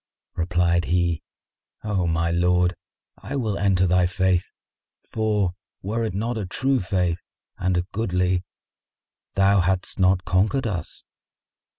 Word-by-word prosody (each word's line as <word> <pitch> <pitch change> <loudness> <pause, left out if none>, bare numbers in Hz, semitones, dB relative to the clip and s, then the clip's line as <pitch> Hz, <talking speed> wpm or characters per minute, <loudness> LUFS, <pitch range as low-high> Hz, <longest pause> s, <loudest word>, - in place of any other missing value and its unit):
Replied 85 0 +1
he, 85 -2 +1 0.6
"O 100 -5 0
my 85 0 +1
lord, 90 +1 +2 0.5
I 140 - -6
will 110 -7 -1
enter 95 -2 +2
thy 90 0 +3
faith; 95 -1 +1 0.5
for, 105 -4 0 0.3
were 110 +4 -1
it 110 -5 -2
not 115 +3 -1
a 100 - -4
true 135 +7 +1
Faith 90 -2 -1 0.4
and 90 0 +1
a 90 - 0
goodly, 90 -4 0 0.9
thou 100 +1 +4
hadst 95 +2 0
not 95 -1 +3
conquered 105 +9 +1
us. 90 -7 -4
95 Hz, 125 wpm, -24 LUFS, 90-100 Hz, 0.9 s, thou